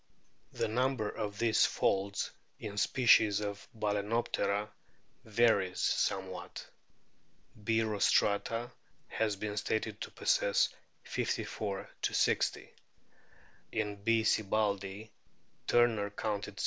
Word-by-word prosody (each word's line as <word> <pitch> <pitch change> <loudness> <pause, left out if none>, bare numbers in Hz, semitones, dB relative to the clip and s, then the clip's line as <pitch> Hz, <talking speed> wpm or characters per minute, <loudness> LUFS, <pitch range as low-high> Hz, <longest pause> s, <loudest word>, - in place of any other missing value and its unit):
The - - -1
number 125 0 0
of 105 -1 -4
these 115 0 +4
folds 100 0 0 0.3
in 105 -1 -7
species 110 -3 +4
of 100 -1 -5
Balanop 105 +1 -1
tera 100 +1 0 0.5
varies 105 -4 +2
somewhat. 95 -1 -1 1.0
B. 115 +1 +2
rostrata 110 +2 +1 0.4
has 110 -2 0
been 105 +1 -4
stated 110 +1 -2
to - - -4
possess - - +2 0.3
54 100 -3 -3
60; - - +1 1.0
in 105 -2 -2
B. 115 0 +3
sibbaldii 105 -1 0 0.6
Turner 115 -4 +3
counted 105 0 -3
60. - - -12
105 Hz, 95 wpm, -32 LUFS, 100-110 Hz, 1.0 s, these